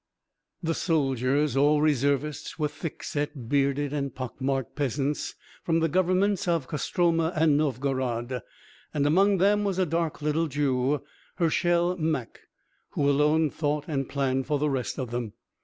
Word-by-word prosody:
The 165 0 +1
soldiers, 140 -3 +1
all 145 +2 +4
reservists, 145 0 0
were 150 -2 +1
thick 165 +1 -7
set, 145 -4 -3
bearded 140 +1 +1
and 140 -3 -3
pock 130 +1 -6
marked 135 -2 -1
peasants 145 +1 -1 0.3
from 165 -1 +2
the 165 - +2
governments 185 +3 +1
of 165 -6 +1
Kostroma 165 +2 +1
and 155 -2 +4
Novgorod 130 -3 -1 0.5
and 145 -1 +2
among 195 +6 +4
them, 205 +3 +3
was 195 -3 -1
a 185 - +3
dark 165 0 -1
little 150 +2 0
Jew, 135 -1 0 0.3
Hershel 175 +1 +2
Mak, 155 -7 -2 0.5
who 140 - +1
alone 150 +2 +3
thought 150 -1 -1
and 135 -5 -2
planned 135 -2 0
for 150 - +1
the 150 +1 0
rest 130 -3 -2
of 125 -4 -4
them. 120 -3 -3
150 Hz, 150 wpm, -27 LUFS, 135-165 Hz, 0.5 s, all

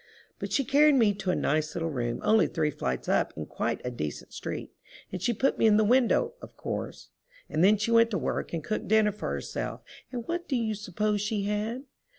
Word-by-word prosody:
But - - -5
she 275 - +1
carried 295 +2 +5
me 225 -5 +4
to 195 -1 -4
a 180 - +2
nice 155 +1 0
little 165 -1 -2
room 120 -3 -2
only 220 0 +4
three 155 -3 0
flights 65 - -3
up - - +1
in 80 - -4
quite - - -2
a 125 - -2
decent 75 -11 -5
street. - - -5 0.4
And 185 - -5
she 240 - +2
put 260 +4 0
me 225 - +5
in 210 -1 +5
the 215 - +4
window, 260 - +3
of - - -12
course. - - -5 0.4
And 160 - 0
then 210 +3 +6
she 210 +3 -1
went 230 0 +6
to 205 - -1
work - - -2
and 165 -3 -3
cooked 215 +7 -3
dinner 215 -1 +4
for 210 - -5
herself. - - -4 0.3
And 240 -3 -5
what 345 +1 -3
do 270 - 0
you 225 -3 0
suppose 210 +1 -1
she 210 0 -1
had? 210 +5 -2
210 Hz, 220 wpm, -28 LUFS, 170-230 Hz, 0.4 s, then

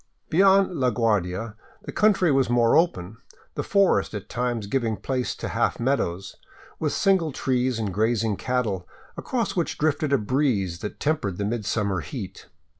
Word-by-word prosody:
Beyond 190 -1 +4
La 130 -1 +3
Guardia 105 -2 0 0.3
the - - -6
country 195 -5 +3
was 135 -2 +2
more 120 -1 +3
open, 115 - +1 0.4
the - - -3
forest 200 - +2
at 100 - -7
times 120 -3 -2
giving 115 0 -1
place 130 -2 -2
to - - -5
half - - 0
meadows, 100 -8 -1 0.4
with 155 -2 0
single 190 -6 +2
trees 130 -2 0
and 105 -4 -3
grazing 110 +1 +1
cattle, 110 -7 -2 0.3
across 240 -5 -2
which 170 -3 -1
drifted 150 -1 0
a 140 - +5
breeze 105 - 0
that 105 - -6
tempered 140 - -1
the 100 - -2
midsummer 105 -3 -1
heat. 75 - -8
120 Hz, 155 wpm, -24 LUFS, 105-150 Hz, 0.4 s, a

